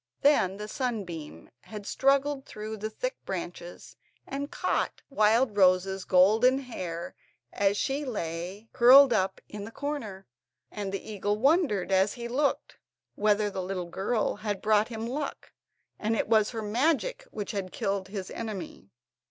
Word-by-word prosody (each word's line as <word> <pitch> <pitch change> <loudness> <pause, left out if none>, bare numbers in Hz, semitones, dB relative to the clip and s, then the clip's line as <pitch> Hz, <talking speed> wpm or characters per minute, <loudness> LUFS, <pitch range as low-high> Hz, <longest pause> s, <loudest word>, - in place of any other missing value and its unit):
Then 200 -10 +4
the 210 0 -6
sunbeam 190 - -5
had 210 - -9
struggled 275 +2 +2
through 215 +1 -6
the 215 +1 -4
thick - - -4
branches 175 -1 -7 0.3
and 280 +1 -4
caught - - -1
Wildrose's 200 -5 +3
golden 220 +8 +5
hair 185 -11 -5 0.4
as 200 0 +2
she 285 +3 -1
lay 185 - -5
curled 260 +1 +8
up 190 -1 0
in 210 -1 -7
the 205 - -7
corner, 230 -8 -5 0.5
and 205 -2 -4
the 195 - -5
eagle 205 -1 -1
wondered, 265 - +2
as 190 +2 +3
he 235 -1 -6
looked, 275 +4 -1 0.4
whether 210 0 +2
the 190 - -3
little 185 -1 -3
girl 210 +3 -1
had 205 -2 -3
brought 215 0 +3
him 225 -1 -5
luck, 280 +4 -5 0.5
and 220 +2 0
it - - 0
was 215 -1 +4
her 225 -2 -5
magic 325 - 0
which 205 -2 -5
had 195 -4 -4
killed 195 -1 -2
his 190 -1 -6
enemy. 210 - -6
210 Hz, 145 wpm, -28 LUFS, 195-255 Hz, 0.5 s, curled